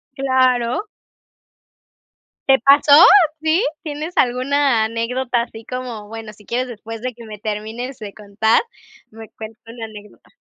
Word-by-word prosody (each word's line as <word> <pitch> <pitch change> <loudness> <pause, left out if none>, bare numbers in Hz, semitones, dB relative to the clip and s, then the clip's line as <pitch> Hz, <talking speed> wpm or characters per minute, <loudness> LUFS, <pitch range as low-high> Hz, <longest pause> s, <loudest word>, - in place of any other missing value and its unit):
Claro. 260 - +1 1.6
¿Te 265 - +7
pasó? 285 +4 +5 0.5
¿Sí? 320 +7 +2 0.2
¿Tienes 310 +3 -6
alguna 255 -1 +2
anécdota 240 +2 -2
así 225 -1 -11
como? 245 -5 -6
Bueno, 225 -1 -9
si 210 -1 -20
quieres 250 +2 -1
después 225 -1 -8
de 255 -1 -3
que 235 0 -13
me 210 -1 -8
termines 220 +5 -5
de 205 -2 -7
contar, 210 +2 +1 0.5
me 225 0 -12
cuenta 220 0 -10 0.2
la 225 - -5
anécdota. 210 -1 -14
235 Hz, 130 wpm, -19 LUFS, 220-260 Hz, 1.6 s, Te